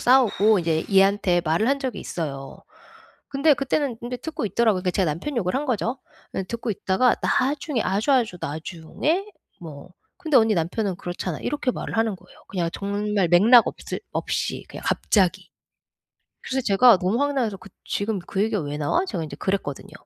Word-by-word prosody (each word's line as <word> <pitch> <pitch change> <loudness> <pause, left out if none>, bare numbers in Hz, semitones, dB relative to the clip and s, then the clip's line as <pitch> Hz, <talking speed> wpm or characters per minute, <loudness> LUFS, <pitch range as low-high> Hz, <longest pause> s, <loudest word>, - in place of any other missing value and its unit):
싸우고 220 -4 +4
인제 160 -2 0
얘한테 195 -2 +4
말을 170 +9 +1
한 280 - +2
적이 260 -3 -4
있어요. 140 -5 -5 0.7
근데 285 +2 +3
그때는 275 -1 -1
근데 240 +2 -5
듣고 315 -3 -5
있더라고요. 215 -3 +1
제가 185 0 0
남편 215 - -5
욕을 185 -3 0
한 275 +3 0
거죠. 245 +1 -1 0.4
예 - - -1
듣고 235 +4 -4
있다가 200 +4 +2
나중에 275 -1 0
아주 205 +9 +1
아주 230 -8 +2
나중에 165 - -2 0.4
뭐 155 -2 -10 0.3
"근데 315 -7 +1
언니 225 -2 +5
남편은 185 +3 -1
그렇잖아." 175 -2 -5
이렇게 290 -3 -1
말을 235 - -5
하는 225 -2 +1
거예요. - - -20
그냥 175 -3 -1
정말 200 -1 -1
맥락 215 +8 +7
없을 - - -6
없이 - - -2
그냥 - - -9
갑자기. 185 -3 +1 0.9
그래서 265 0 -2
제가 205 +2 +6
너무 190 +6 0
황당해서 265 -8 0
그 190 - -14 0.2
"지금 205 0 -2
그 190 +2 -3
얘기가 215 -4 0
왜 145 0 -4
나와?" 155 - +1
제가 180 - -3
인제 150 -2 -7
그랬거든요. 190 -8 -3
205 Hz, 365 characters per minute, -24 LUFS, 180-250 Hz, 0.9 s, 맥락